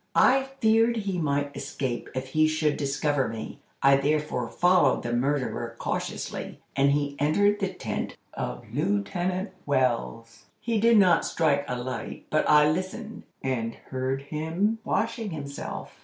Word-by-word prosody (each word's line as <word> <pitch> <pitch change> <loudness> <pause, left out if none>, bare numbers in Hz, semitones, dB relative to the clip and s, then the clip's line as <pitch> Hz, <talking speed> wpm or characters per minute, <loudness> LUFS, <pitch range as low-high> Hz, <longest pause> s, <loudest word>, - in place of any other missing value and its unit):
I 265 +1 +5
feared 225 +1 +4
he 195 -4 -2
might 145 -2 -1
escape 135 -4 -4
if 130 0 -3
he 155 +3 +3
should 155 -1 +1
discover 145 -1 0
me. 115 -1 -6 0.2
I 135 0 +7
therefore 145 -3 0
followed 175 -6 +3
the 120 - -2
murderer 125 -2 -1
cautiously, - - -4 0.2
and 140 +1 +4
he 145 -1 -1
entered 205 +8 +3
the 195 -3 -1
tent - - -4 0.2
of 60 0 -5
Lieutenant 175 - -1 0.2
Wells. 115 -4 -1
He 230 -2 0
did 230 +1 +5
not 185 -4 +5
strike 145 -4 +1
a 125 - -2
light, 125 +1 -5
but 155 - +2
I 150 0 +7
listened, 185 +8 -3 0.2
and 115 -4 -1 0.2
heard 130 +1 -2
him 165 +9 -1
washing 225 +1 -1
himself. 140 -4 -6
145 Hz, 140 wpm, -27 LUFS, 130-185 Hz, 0.2 s, I